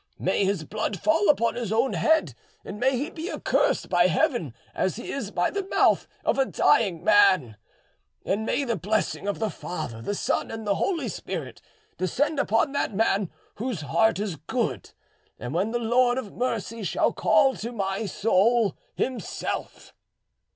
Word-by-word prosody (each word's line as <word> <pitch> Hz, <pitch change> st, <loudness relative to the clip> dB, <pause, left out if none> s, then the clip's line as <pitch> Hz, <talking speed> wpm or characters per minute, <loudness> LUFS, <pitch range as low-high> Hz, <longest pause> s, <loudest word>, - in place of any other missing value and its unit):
May -, -, +1 dB
his 190 Hz, -4 st, 0 dB
blood 210 Hz, +2 st, -3 dB
fall 320 Hz, -, +2 dB
upon 235 Hz, -5 st, +3 dB
his 235 Hz, -4 st, -4 dB
own 230 Hz, +4 st, +2 dB
head, 315 Hz, -, +2 dB, 0.3 s
and 210 Hz, -, -7 dB
may 260 Hz, +1 st, +2 dB
he 290 Hz, +7 st, -3 dB
be 330 Hz, +4 st, -5 dB
accursed -, -, +1 dB
by -, -, +4 dB
Heaven -, -, +1 dB, 0.2 s
as -, -, -1 dB
he -, -, -6 dB
is -, -, -4 dB
by -, -, 0 dB
the 400 Hz, -1 st, -3 dB
mouth -, -, +3 dB, 0.2 s
of -, -, +1 dB
a 270 Hz, -, +4 dB
dying 190 Hz, -10 st, +2 dB
man; 185 Hz, -, +4 dB, 0.7 s
and 205 Hz, +3 st, 0 dB
may 280 Hz, -, 0 dB
the 235 Hz, -4 st, -1 dB
blessing 205 Hz, 0 st, -1 dB
of 205 Hz, -, -1 dB
the 220 Hz, -2 st, -1 dB
Father, 155 Hz, -10 st, -6 dB
the 205 Hz, -, -3 dB
Son, -, -, -1 dB
and 225 Hz, -1 st, -6 dB
the 205 Hz, -, +2 dB
Holy 340 Hz, -, -1 dB
Spirit -, -, -6 dB, 0.4 s
descend 280 Hz, -, 0 dB
upon 230 Hz, +3 st, +2 dB
that 280 Hz, -7 st, -1 dB
man 200 Hz, -3 st, +1 dB, 0.3 s
whose 230 Hz, -, -3 dB
heart 200 Hz, +11 st, +2 dB
is 200 Hz, -5 st, -3 dB
good, -, -, -3 dB, 0.5 s
when 170 Hz, -, -2 dB
the 240 Hz, -, -1 dB
Lord 245 Hz, +2 st, +2 dB
of 230 Hz, -7 st, -5 dB
mercy 230 Hz, -2 st, -3 dB
shall 190 Hz, -, +1 dB
call 215 Hz, +5 st, +3 dB
to 230 Hz, +3 st, -5 dB
my 195 Hz, -1 st, -2 dB
soul 220 Hz, +2 st, +2 dB, 0.2 s
Himself!" 255 Hz, -1 st, -4 dB
220 Hz, 165 wpm, -26 LUFS, 195-250 Hz, 0.7 s, by